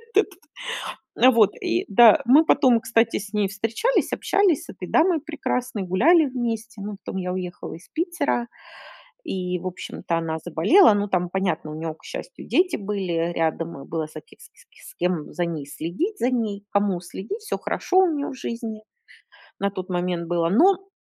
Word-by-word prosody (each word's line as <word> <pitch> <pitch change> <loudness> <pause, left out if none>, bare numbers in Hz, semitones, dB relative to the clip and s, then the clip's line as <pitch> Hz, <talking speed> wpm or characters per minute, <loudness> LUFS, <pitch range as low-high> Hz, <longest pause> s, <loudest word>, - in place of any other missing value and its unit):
Вот 420 - +6
этот. 370 -3 -17 0.8
На, 255 +3 +7
вот. 225 -4 +5
И, 115 - 0
да, 235 +7 +7
мы 280 +7 +7
потом, 255 -7 +4
кстати, 225 0 +1
с 205 0 -9
ней 210 -2 +1
встречались, 225 - 0
общались 385 -7 +2
с - - -20
этой 180 -1 -8
дамой 330 -2 +3
прекрасной, 255 -8 -3
гуляли 295 - +4
вместе, 230 -4 -4
ну, 205 0 -6
потом - - -4
я 180 0 -3
уехала 180 -1 -5
из 170 - -15
Питера. 335 -7 -1 0.8
И, 180 -1 -2
в 185 - -8
общем-то, 180 -1 -4
она 160 -1 -2
заболела, 205 - +5
ну, 205 0 0
там 180 -2 0
понятно, 175 -5 -2
у - - -6
нее, 160 0 -4
к - - -23
счастью, - - -8
дети 365 0 +2
были, 195 -3 -3
э, 165 +1 0
рядом, 165 -2 -2
и - - -14
было 160 -1 -2
за 155 0 -10
кем - - -21
с - - -15
с - - -17
с - - -17
кем 175 -3 -2
за 175 - -1
ней 160 -4 -4
следить, 175 - -3
за 245 - +2
ней 215 -5 -2
кому 200 -3 +1
следить, 195 - -7
всё - - -3
хорошо 370 - 0
у 380 - +6
нее 285 - -2
в - - -6
жизни 225 -3 -5 0.8
на 200 0 +1
тот 185 -1 -7
момент 175 -1 -2
было. 170 -1 +1
Но 380 - +4
205 Hz, 190 wpm, -24 LUFS, 175-260 Hz, 0.8 s, На